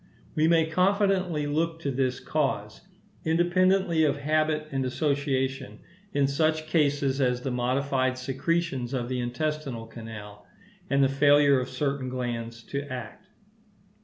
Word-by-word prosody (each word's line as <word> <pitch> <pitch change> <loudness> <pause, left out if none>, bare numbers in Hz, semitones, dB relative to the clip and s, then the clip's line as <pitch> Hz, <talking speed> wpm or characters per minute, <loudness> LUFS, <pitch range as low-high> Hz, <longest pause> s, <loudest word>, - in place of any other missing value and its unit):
We 155 +1 +2
may 165 -1 +4
confidently 185 -2 +1
look 165 +3 -1
to 140 - -1
this 130 -1 0
cause, 110 -9 -2 0.4
independently 175 +1 +3
of 145 -2 +2
habit 155 +1 0
and 135 -1 -1
association, 135 -4 -1 0.3
in 140 -1 +2
such 155 +3 +1
cases 145 -3 +1
as 125 -1 +1
the 135 - -2
modified 130 +1 0
secretions 135 0 -1
of 120 -1 -2
the 130 -1 -2
intestinal 125 0 -3
canal, 105 -3 -10 0.4
and 140 0 +3
the - - +5
failure 145 0 +5
of 125 - -4
certain 135 -1 -2
glands 115 -2 -4
to 140 - -4
act. 125 +8 -7
140 Hz, 135 wpm, -27 LUFS, 125-155 Hz, 0.4 s, the